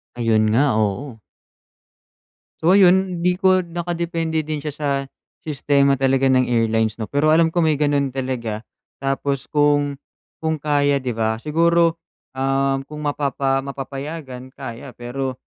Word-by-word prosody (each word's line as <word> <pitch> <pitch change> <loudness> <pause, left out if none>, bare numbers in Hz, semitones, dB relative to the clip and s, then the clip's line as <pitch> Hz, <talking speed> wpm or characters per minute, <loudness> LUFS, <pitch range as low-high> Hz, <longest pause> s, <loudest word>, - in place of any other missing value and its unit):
Ayun 115 -2 +2
nga, 140 +3 +3
oo. 110 +4 -2 1.4
So, 165 - +4
ayun 190 -1 +4
hindi 180 +1 +2
ko 185 0 +3
nakadepende 170 -2 -2
din 155 -1 -4
siya 150 - -3
sa 145 0 -3 0.5
sistema 140 -2 +2
talaga 135 0 +2
ng 130 -1 +3
airlines 110 -2 +1
'no, 110 - -4
pero 145 +7 0
alam 160 +1 +4
ko 175 - 0
may 160 -2 +3
ganun 145 -1 +1
talaga 120 -5 -3 0.3
tapos 135 0 -2
kung 145 -1 +2 0.4
kung 160 0 -1
kaya 145 -1 +1
'di 125 - -1
ba, 110 -1 0
siguro, 165 +5 +2 0.3
um, 135 +1 0
kung 150 0 -8
mapapa 140 -2 0
mapapayagan 135 -1 -7
kaya, 125 -1 -8
pero 130 +2 -4
140 Hz, 135 wpm, -21 LUFS, 130-160 Hz, 1.4 s, So